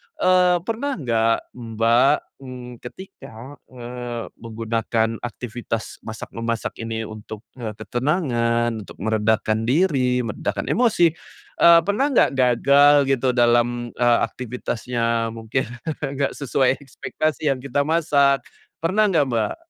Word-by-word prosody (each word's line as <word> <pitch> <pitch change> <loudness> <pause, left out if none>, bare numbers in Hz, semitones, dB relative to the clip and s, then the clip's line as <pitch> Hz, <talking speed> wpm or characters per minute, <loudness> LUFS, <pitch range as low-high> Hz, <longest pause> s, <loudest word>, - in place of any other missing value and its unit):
eee, 180 -1 +4
pernah 235 +7 -2
nggak 115 -5 +1 0.2
Mbak 115 +2 +2 0.2
ng 125 -2 -9
ketika, 135 -4 -11
eee, 120 -1 -6 0.2
menggunakan 115 0 -2
aktivitas 120 -1 -5
masak-memasak 115 +1 -4
ini 115 0 -4
untuk, 110 0 -9 0.2
eee, 110 -3 -5
ketenangan, 120 - 0
untuk - - -12
meredakan 110 0 0
diri, 130 -5 +2
meredakan 105 -3 -3
emosi, 220 -9 +3 0.5
eee, 170 0 +8
pernah 205 +10 +1
nggak - - +5
gagal 140 +3 +4 0.2
gitu 130 -1 +1
dalam, 120 0 +2
eee, 120 -1 +2
aktivitasnya? 115 -1 -2
Mungkin 115 +3 -2 0.3
nggak 140 0 -2
sesuai 135 -1 0
ekspektasi 145 +2 -2
yang 130 - -2
kita 140 +2 -1
masak, 145 -3 +3 0.4
pernah 185 +6 +2
nggak, 150 -6 +2
Mbak? 115 -3 -1
120 Hz, 115 wpm, -22 LUFS, 115-140 Hz, 0.5 s, eee